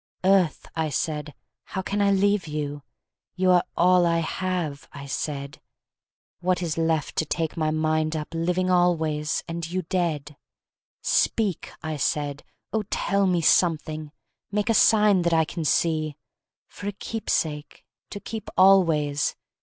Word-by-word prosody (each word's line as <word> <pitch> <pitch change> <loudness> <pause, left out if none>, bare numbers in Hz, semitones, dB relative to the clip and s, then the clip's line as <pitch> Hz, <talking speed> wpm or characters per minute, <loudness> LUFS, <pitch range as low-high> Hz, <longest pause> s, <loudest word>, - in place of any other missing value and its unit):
"Earth," 190 -4 +3
I 160 -1 0
said, 150 0 -3 0.3
"how 190 - -5
can 205 +2 -1
I 200 - +4
leave 200 -2 +2
you?" 145 -1 -4 0.5
"You 185 0 +3
are 180 -1 +5
all 180 0 +5
I 170 0 +2
have," 165 -3 -3
I 140 0 -9
said; 140 0 -4 0.8
"What 180 -1 0
is 160 -3 -2
left 160 -2 0
to 160 - +1
take 160 0 -2
my 155 -2 0
mind 155 0 0
up, 150 -1 -4
Living 180 +3 0
always, 160 -4 +1
and 165 -1 -4
you 185 +1 -2
dead?" 155 -5 -2 0.7
"Speak!" 205 -7 +1
I 155 -1 -3
said, 145 0 -1 0.3
"Oh, 220 - +1
tell 200 -1 +1
me 180 -2 +2
something! 155 -3 +2 0.4
Make 210 +2 -1
a - - +4
sign 210 -3 +5
that 170 -1 +1
I 160 -1 +3
can 165 +1 -5
see! 155 -1 +1 0.5
For 200 - -8
a 205 - -2
keepsake! 160 -8 -3 0.2
To 205 - -6
keep 220 0 -7
always! 165 -7 +4
165 Hz, 145 wpm, -25 LUFS, 155-185 Hz, 0.8 s, are